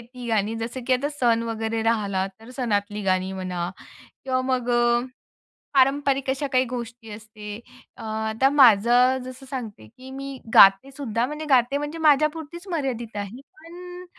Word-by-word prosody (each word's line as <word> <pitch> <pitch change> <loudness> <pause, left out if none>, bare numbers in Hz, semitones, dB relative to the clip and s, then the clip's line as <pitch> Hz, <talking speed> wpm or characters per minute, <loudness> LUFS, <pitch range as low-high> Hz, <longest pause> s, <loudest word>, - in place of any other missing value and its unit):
ती 250 -1 -8
गाणी, 220 0 0
जसं 230 +3 -5
की 260 - +2
आता 260 +3 +1
सण 240 -6 +1
वगैरे 225 0 -2
राहिला 205 -4 0
तर 225 +2 -13
सणातली 210 -4 -1
गाणी 185 0 0
म्हणा 180 -2 -4 0.5
किंवा 260 -1 0
मग 255 -2 -1 1.1
पारंपरिक 275 0 +2
अशा 270 +2 -1
काही 255 -1 +3
गोष्टी 235 -2 -7
असतात. 210 0 -9 0.4
आता 220 +3 0
माझं 250 -1 +5
जसं 255 +1 -10
सांगते 230 - -7
की 260 +1 -12
मी 275 0 -7 0.2
गातेसुद्धा, 230 +4 +5
म्हणजे 300 +3 -6
गाते 260 +1 +3
म्हणजे 295 +2 -5
माझ्यापुरतीच 315 +3 +1
मर्यादित 250 -8 -3
आहे. 205 +5 -6 0.2
पण 355 +2 -11
245 Hz, 140 wpm, -24 LUFS, 220-275 Hz, 1.1 s, माझं